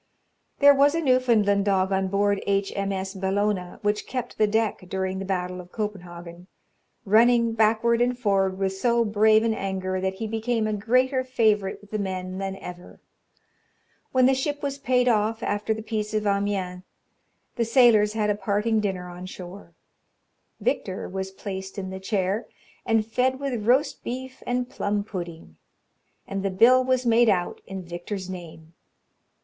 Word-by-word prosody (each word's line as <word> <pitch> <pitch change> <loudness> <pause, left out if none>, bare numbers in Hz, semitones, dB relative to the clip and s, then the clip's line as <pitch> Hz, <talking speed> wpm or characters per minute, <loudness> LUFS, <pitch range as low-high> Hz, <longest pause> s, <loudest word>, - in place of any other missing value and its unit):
There 285 0 +7
was 285 +2 +4
a - - +1
Newfoundland 235 -8 +3
dog 190 -1 +2
on 190 0 +1
board 200 +1 +1
H. 195 0 0
M. 200 0 -1
S. 190 0 -3
Bellona, 195 -1 -1
which 210 0 0
kept 250 -2 -5
the 215 - +4
deck 220 0 0
during 190 0 -2
the 195 - -4
battle 180 -1 -3
of 180 0 -16
Copenhagen, 175 -4 -6 0.6
running 230 +2 +4
backward 225 +2 +2
and 245 0 +1
forward 195 -5 +1
with 195 -1 -1
so 235 +3 +2
brave 215 +1 +4
an 230 -1 +1
anger, 190 -2 -3
that 190 0 -1
he 220 +3 -4
became 225 +1 -1
a 215 - -1
greater 255 +5 +1
favourite 215 -7 +1
with 205 - -18
the 215 - -2
men 185 -1 -4
than 195 0 -3
ever. 180 -2 -10 1.1
When 255 -1 +4
the 265 - +5
ship 290 +2 -2
was 280 0 -3
paid 250 -2 +2
off, 220 0 +1
after 205 +2 -1
the 220 0 -2
peace 215 -1 -3
of 215 0 0
Amiens, 200 -3 -1 0.7
the 235 - +1
sailors 225 -3 +5
had 210 -1 +1
a - - 0
parting 210 +2 0
dinner 190 -4 -2
on 180 +1 -8
shore. 185 +1 -10 0.8
Victor 195 - -2
was 190 +1 -4
placed 190 0 -7
in 190 -1 -4
the 190 - -6
chair, 195 +1 -1 0.4
and 225 -1 +2
fed 255 +4 0
with 250 -6 -3
roast 270 +4 +2
beef 260 +2 -6
and 245 0 0
plum 205 -4 -2
pudding, 170 - -8 0.7
and 195 0 -3
the 195 - -1
bill 240 +7 +5
was 255 -1 +1
made 235 0 +5
out 180 -3 0
in 190 -1 -6
Victor's 180 +2 -6
name. 165 -3 -10
205 Hz, 165 wpm, -25 LUFS, 190-235 Hz, 1.1 s, There